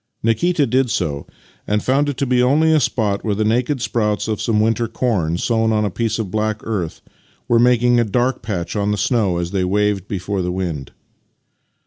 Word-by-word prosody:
Nikita 145 +8 +2
did 130 +1 +1
so, 75 -9 -2 0.4
and 105 0 0
found 140 +3 +2
it 140 - -4
to 140 - 0
be 125 -1 +2
only 150 +6 +3
a 155 - +4
spot 110 -6 0
where 105 -3 0
the 110 +1 0
naked 125 +4 0
sprouts 105 -3 -1
of 110 -2 -2
some 110 -2 +1
winter 115 +2 +1
corn 90 -12 -1
sown 110 +2 +1
on 105 -1 +1
a 100 - -2
piece 115 +2 -1
of 105 -5 -4
black 110 0 -1
earth 95 -8 -3 0.5
were 115 - +3
making 120 0 +4
a - - +4
dark 125 +4 0
patch 95 -6 -4
on 105 0 0
the 105 - 0
snow 100 -3 +1
as 85 0 -3
they 95 -2 0
waved 100 0 0
before 100 0 -3
the 90 0 -2
wind. 85 -7 -4
110 Hz, 200 wpm, -19 LUFS, 100-120 Hz, 0.5 s, a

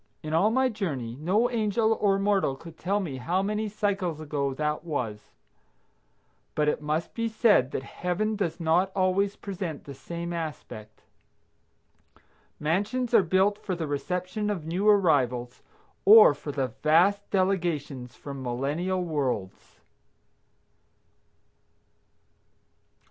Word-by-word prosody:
In 155 0 -4
all 180 +7 +4
my 260 +3 +2
journey, 150 - -4
no 200 +10 +2
angel 220 -1 +1
or 195 -2 +3
mortal 195 -8 +1
could 165 +4 -12
tell 195 +5 -1
me 155 -9 -4
how 175 +9 -1
many 210 +1 -1
cycles 195 -6 -1
ago 145 -3 -2
that 150 +2 -2
was. 120 -10 -4 1.3
But 150 0 +1
it 150 - 0
must 155 +2 -2
be 230 0 -1
said 215 - +3
that 130 - -4
Heaven 190 +9 -2
does 180 -5 -2
not 170 +3 +2
always 195 +2 +1
present 185 -6 -6
the 140 - -9
same 170 +5 -6
aspect. 150 -10 -7 1.6
Mansions 210 +10 -1
are - - +7
built 190 +3 +2
for 190 -4 -3
the 170 -2 -3
reception 180 +8 -3
of 185 -7 -3
new 185 +6 +1
arrivals, 130 - +2 0.4
or 215 -5 +9
for 145 - -7
the 135 -2 -1
vast 180 +7 +3
delegations 165 -10 -1
from 140 -2 -8
millennial 145 +9 -2
worlds. 135 - -3
175 Hz, 125 wpm, -27 LUFS, 145-200 Hz, 1.6 s, or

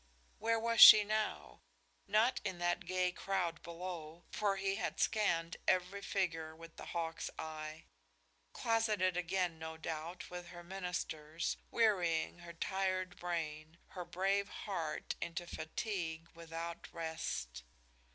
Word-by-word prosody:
Where 230 +1 +2
was 230 0 +2
she 210 - +13
now? 210 - -2 0.5
Not 220 +5 +3
in 190 -3 -2
that 175 0 0
gay 185 0 +1
crowd 180 -3 -1
below, 170 -1 -7
for 205 -2 +1
he 195 0 0
had - - -2
scanned 170 -6 +1
every 185 +2 +2
figure 165 -6 -1
with 165 0 -12
the - - -8
hawk's 165 -1 -3
eye. 155 0 -6 0.7
Closeted 215 -5 +1
again, 180 -1 0
no 160 0 -6
doubt, 160 +3 -5
with 180 -1 -6
her 175 0 -10
ministers, 170 -4 -3
wearying 180 -7 +2
her 170 0 -9
tired 185 +1 -1
brain, 160 -2 -3
her 180 - -6
brave 195 +3 0 0.2
heart 175 -6 -2
into 170 +1 -3
fatigue 165 -1 -4
without 165 0 -6
rest. 160 - -4
175 Hz, 125 wpm, -36 LUFS, 165-195 Hz, 0.7 s, she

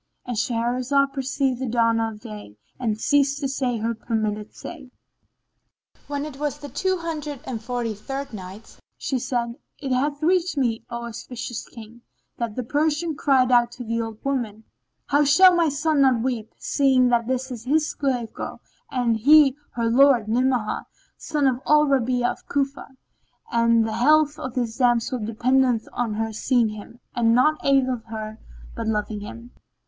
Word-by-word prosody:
—And 245 - -3
Shahrazad 250 +4 +1
perceived 270 -1 -1
the 260 - -2
dawn 230 -1 +2
of 225 -2 -3
day 210 - -10 0.2
and 220 -4 -1
ceased 280 +2 +2
to 280 - -1
say 260 -3 -1
her 225 +1 -1
permitted 215 -2 -3
say. 290 -7 -9 1.2
When 285 0 -3
it 285 -3 -9
was 295 -1 -2
the 290 -1 -9
Two 375 +4 0
Hundred 305 -4 -5
and 230 -4 -4
Forty 240 -1 -3
third 270 +6 -6
Night, 195 +2 -10 0.2
She 265 - -2
said, 235 -1 -2 0.2
It 275 -2 -5
hath 285 +3 0
reached 360 -1 +2
me, 235 -4 0
O 235 0 -5
auspicious 235 0 -6
King, 230 0 -12 0.4
that 230 -3 -3
the 255 - -2
Persian 305 +5 0
cried 260 -3 +3
out 240 -1 +4
to 250 - -7
the 230 0 -1
old 225 -1 -5
woman, 235 -6 -2 0.4
"How 290 +1 +3
shall 365 +6 +7
my 335 -2 +3
son 295 +1 +1
not 255 -4 +4
weep, 240 -4 -2
seeing 265 -3 +3
that 235 -1 +2
this 260 +1 -2
is 235 -2 -7
his 305 +3 +2
slave 250 -5 -2
girl - - -6 0.3
and 245 -3 +1
he 280 +3 +6 0.2
her 235 -1 -1
lord, 245 -2 +5
Ni'amah 245 -1 0 0.3
son 295 -2 -1
of 260 -1 +1
al 300 0 +5
Rabi'a 255 -3 +1
of - - -12
Cufa; 280 0 -1 0.6
and 230 -1 +3
the 220 - -3
health 300 +3 +4
of 255 0 -6
this 235 -3 -2
damsel 245 0 +2
dependeth 235 +2 +1
on 230 -3 -2
her 225 0 -2
seeing 235 0 +2
him 215 +3 -10 0.2
and 230 -1 +3
naught 305 +5 +3
aileth 260 -4 +2
her 220 -1 -7 0.4
but 230 -1 -4
loving 210 -1 -1
him. 230 +4 -9
250 Hz, 170 wpm, -23 LUFS, 230-275 Hz, 1.2 s, shall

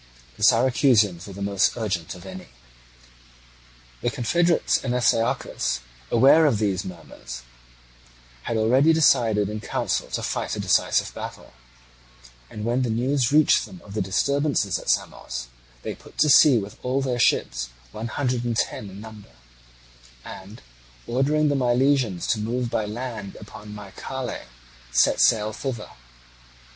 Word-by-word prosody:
The - - -15
Syracusans 115 - +3
were 100 - -9
the 100 +1 -6
most 100 +2 +1
urgent 95 -8 -3
of 90 +1 -13
any. 95 -1 -9 1.5
The - - 0
confederates 170 +8 +1
and 125 -2 -1
Astyochus, 115 - 0 0.3
aware 140 +7 +6
of 125 -7 +2
these 100 -3 -1
murmurs, 65 -8 -9 1.0
had 115 - -1
already 130 +8 +4
decided 115 -10 +3
in 105 +1 -5
council - - -2
to - - -4
fight - - -2
a - - -6
decisive - - +1
battle; - - -8 1.0
and 105 0 -6
when 120 +2 +1
the 125 - -1
news 125 +3 +1
reached 150 +1 +4
them 185 - -12
of 100 - -11
the 110 - -1
disturbance 140 +8 +1
at - - -7
Samos, 60 0 -2 0.3
they - - -4
put - - -17
to 150 - +4
sea 140 -3 +7
with 100 -1 -5
all 130 +2 -1
their 125 -2 -1
ships, - - +1 0.2
one 110 +2 -5
hundred 125 0 -1
and 120 -2 -2
ten 105 0 -2
in 95 +2 -10
number, 105 -10 -12 0.9
and, 95 - -10 0.4
ordering 145 +5 +1
the 145 - +1
Milesians 125 -6 +1
to 110 - +1
move 120 +2 -2
by 110 - 0
land 110 -3 -6
upon 105 0 -11
Mycale, 115 +5 -6 0.5
set - - +3
sail 110 0 +3
thither. 120 -3 -5
115 Hz, 145 wpm, -24 LUFS, 100-130 Hz, 1.5 s, sea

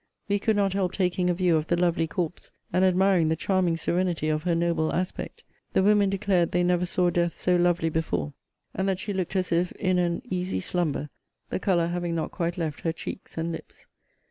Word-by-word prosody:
We 205 0 +1
could 220 +2 +1
not 200 -2 +2
help 195 -2 0
taking 180 -1 +1
a - - +3
view 175 -2 +3
of 155 0 -2
the 175 - +1
lovely 170 -2 +1
corpse, 165 0 -4 0.2
and 185 +1 +3
admiring 185 -2 +4
the 160 - +2
charming 180 -1 +1
serenity 175 -2 0
of 155 0 0
her 175 -2 +2
noble 165 -2 +1
aspect. 185 +1 -4 0.3
The 190 - +3
women 205 0 +4
declared 190 -3 +1
they 180 - +2
never 180 0 +2
say 175 0 +1
death 170 -1 +1
so 180 - +1
lovely 175 -2 +2
before; 85 - -2 0.4
and 190 +1 -1
that 190 - 0
she 205 +2 -4
looked 185 0 -3
as 185 -1 0
if 175 +1 +1
in 185 -1 +1
an 170 -1 0
easy 180 - -2
slumber, 150 - -1 0.4
the - - -1
colour 180 -3 +2
having 175 0 -2
not 160 - -2
quite 170 +1 -2
left 160 -5 -3
her 165 - 0
cheeks 165 - -8
and 165 +1 -1
lips. 165 - -9
175 Hz, 210 wpm, -26 LUFS, 165-185 Hz, 0.4 s, admiring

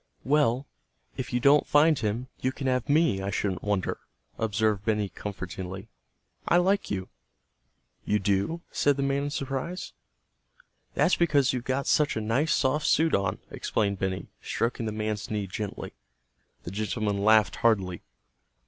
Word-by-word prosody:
"Well, 140 -2 +2 0.5
if 130 - -5
you 125 - +1
don't 140 +3 +5
find 150 0 +4
him, 110 +4 -1
you 130 - 0
can 135 +1 -7
have 130 +1 0
me, 150 -9 +3
I 95 - -2
shouldn't 95 -3 -1
wonder," 105 -3 -1 0.4
observed 110 -2 0
Benny 105 -2 0
comfortingly. 95 0 -6 0.6
"I 175 - +5
like 195 +3 +2
you." 95 -2 -3 0.9
"You 105 - +1
do?" 100 - 0
said 145 -1 +2
the 140 - 0
man 140 +1 0
in - - -2
surprise. 140 +6 -4 1.0
"That's - - +4
because 145 -6 +3
you've 125 -1 -3
got 130 +1 -1
such 150 -6 +2
a - - +1
nice, 125 +9 +1
soft 145 +3 +1
suit 160 +1 +3
on," 100 -1 0
explained 100 -3 -1
Benny, 95 -1 -2 0.2
stroking 115 -1 -2
the - - -2
man's 110 -1 -3
knee 105 -2 -2
gently. 100 +2 -5 0.7
The 85 - -6
gentleman 105 0 -1
laughed 110 0 +4
heartily. 95 -7 +1
110 Hz, 150 wpm, -27 LUFS, 100-140 Hz, 1.0 s, don't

